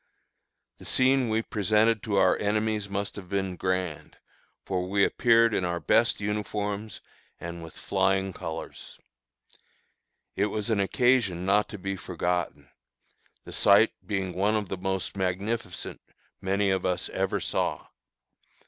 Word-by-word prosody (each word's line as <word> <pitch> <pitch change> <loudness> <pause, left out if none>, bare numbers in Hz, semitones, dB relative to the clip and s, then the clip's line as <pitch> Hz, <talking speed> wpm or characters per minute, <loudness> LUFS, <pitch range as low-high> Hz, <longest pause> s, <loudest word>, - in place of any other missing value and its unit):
The - - -12
scene 130 -1 +3
we 110 +1 +1
presented 110 +2 +2
to 105 - -2
our 95 -1 +5
enemies 105 0 0
must 100 0 -3
have 95 -3 -9
been 95 -2 -1
grand, 90 -3 -3 0.5
for 90 -1 -2
we 100 0 +4
appeared 115 -2 +4
in 95 - +1
our 85 -1 -1
best 115 +6 +3
uniforms 105 0 -3 0.4
and 85 0 -6
with 80 -1 -11
flying 95 0 +1
colors. 80 -1 -7 1.4
It 105 - +2
was 105 +1 -2
an 105 - +2
occasion 100 -4 +2
not 105 +2 +3
to 105 - -7
be 95 +1 -3
forgotten, 90 -5 -3 0.7
the - - -9
sight 105 +2 +5
being 95 -3 -2
one 100 +4 +1
of 105 -3 -2
the 95 - -3
most 95 0 -2
magnificent 95 +1 -3 0.4
many 100 +1 +1
of 95 -1 0
us 90 -1 -1
ever - - -1
saw. - - -1
100 Hz, 140 wpm, -27 LUFS, 95-105 Hz, 1.4 s, our